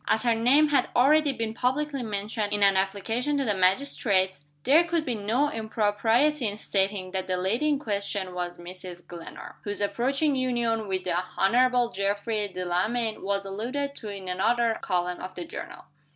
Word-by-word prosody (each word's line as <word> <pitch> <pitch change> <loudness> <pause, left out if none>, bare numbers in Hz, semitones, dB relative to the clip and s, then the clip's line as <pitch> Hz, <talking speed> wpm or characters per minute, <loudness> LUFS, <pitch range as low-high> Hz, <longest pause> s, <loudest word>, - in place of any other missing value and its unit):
As 220 - +2
her 235 -1 +3
name 260 +7 +4
had 275 -3 +2
already 295 +4 +5
been 225 -4 -3
publicly 275 +4 -1
mentioned 210 -1 -3
in 205 -1 +2
an 195 -1 +6
application 225 +9 0
to 275 - 0
the 210 - +2
magistrates, 190 - +1 0.2
there 310 +5 +6
could 335 -2 -1
be 250 - -1
no 230 +7 0
impropriety 225 +5 +1
in 205 0 -3
stating 195 -2 -1
that 190 0 -3
the 185 -1 0
lady 210 +11 0
in 295 -2 +2
question 200 -6 -3
was 175 -1 -4
Mrs. 175 0 -10
Glenarm 170 -1 -10
whose 205 0 -4
approaching 270 +8 0
union 240 -4 0
with 190 -1 -1
the 180 - -1 0.2
Honorable 245 +3 +3
Geoffrey 205 +2 -1
Delamayn 195 +5 -1
was 200 0 -1
alluded 250 +9 -3
to 215 - -7
in 195 -2 -7
another 225 +5 +1
column 180 -1 -1
of 185 - -7
the 175 - -6
journal. - - -8
215 Hz, 170 wpm, -26 LUFS, 190-250 Hz, 0.2 s, an